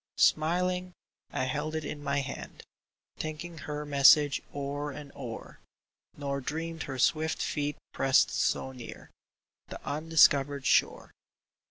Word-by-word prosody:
Smiling, 180 +3 +2 0.4
I - - -1
held 155 +4 -2
it 155 -1 -3
in 145 - -5
my 140 0 0
hand, 135 - -8 0.5
Thinking 155 +2 -6
her 150 0 -5
message 145 0 +5
o'er 145 +1 -3
and 145 0 -9
o'er, - - -8 0.6
Nor 140 -1 -3
dreamed 165 +4 -4
her 135 - -4
swift 155 +5 +1
feet 145 -1 -2 0.2
pressed 135 -1 +3
so 130 - 0
near 125 -3 -10 0.6
The - - -8
undiscovered 145 -3 +3
shore. - - +2
145 Hz, 125 wpm, -29 LUFS, 140-160 Hz, 0.6 s, message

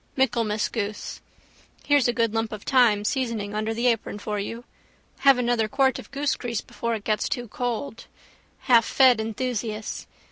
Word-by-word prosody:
Michaelmas 230 -5 +1
goose. 210 -2 -5 0.6
Here's 290 -4 +4
a - - +3
good 230 -1 +1
lump 225 0 -1
of 215 -2 -7
thyme 230 -6 +3
seasoning 230 -5 -2
under 215 +1 -1
the 230 +2 -2
apron 230 -4 +1
for 210 0 -3
you. 230 +4 -5 0.6
Have 275 -2 +6
another 240 -3 +1
quart 265 +4 +1
of - - -11
goosegrease 265 -5 -2
before 235 0 -3
it 210 - -7
gets 215 0 0
too 245 -2 -3
cold. 240 +2 -4 0.6
Halffed 245 0 +5
enthusiasts. 220 -1 -3
230 Hz, 150 wpm, -25 LUFS, 215-250 Hz, 0.6 s, Have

